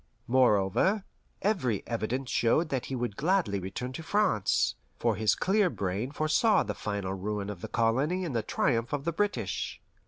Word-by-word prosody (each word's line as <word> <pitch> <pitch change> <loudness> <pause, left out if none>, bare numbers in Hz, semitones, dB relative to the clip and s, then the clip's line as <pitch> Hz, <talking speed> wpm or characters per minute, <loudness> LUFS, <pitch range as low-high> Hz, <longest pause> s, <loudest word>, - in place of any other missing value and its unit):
Moreover, 125 - +3 0.4
every 140 - 0
evidence 120 +2 -2
showed 155 +8 +2
that 130 -4 -2
he 135 - -3
would 120 -4 -2
gladly 165 - +1
return 100 +8 -5
to 165 - -6
France, 190 - +2 0.2
for 115 -2 +1
his 110 +1 +2
clear 195 0 +2
brain 100 - -2
foresaw 155 +8 +3
the - - -3
final 100 -2 -3
ruin 100 +1 -3
of 90 -4 -9
the - - -4
colony 135 +11 +1
and 145 -7 -4
the 115 - +2
triumph 115 +3 0
of 145 0 -2
the 170 - 0
British. 155 - -2
125 Hz, 165 wpm, -29 LUFS, 105-165 Hz, 0.4 s, Moreover